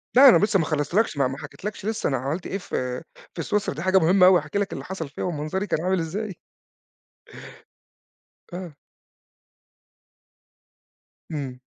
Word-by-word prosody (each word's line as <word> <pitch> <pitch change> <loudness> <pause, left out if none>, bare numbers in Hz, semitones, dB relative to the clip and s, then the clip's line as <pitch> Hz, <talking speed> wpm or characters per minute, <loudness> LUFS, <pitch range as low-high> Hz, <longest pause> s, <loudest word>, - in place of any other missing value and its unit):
لأ، 270 +1 +10
أنا - - +7
لسّا 205 -2 +2
ما 160 - +1
خلصتلكش، 155 +4 0
ما 135 0 0
حكيتلكش 205 +4 -7
لسّا 220 -6 -1
أنا 135 - 0
عملت 140 +8 -3
إيه 195 - -2
في 125 -8 -3 0.3
في - - -4
سويسرا، 210 -6 -1
دي 155 - -5
حاجة 185 +1 +3
مهمة 180 +3 +5
أوي 185 -1 +7
هاحكي 150 +7 -3
لك 200 - -2
اللي - - -6
حصل 180 -6 -5
فيها 145 - -6
ومنظري 175 +4 -2
كان 160 - 0
عامل 185 0 +1
إزاي. 190 +4 -4 2.1
آه. 180 -2 -6 2.6
امم. 135 -4 -5
180 Hz, 150 wpm, -24 LUFS, 150-195 Hz, 2.6 s, لأ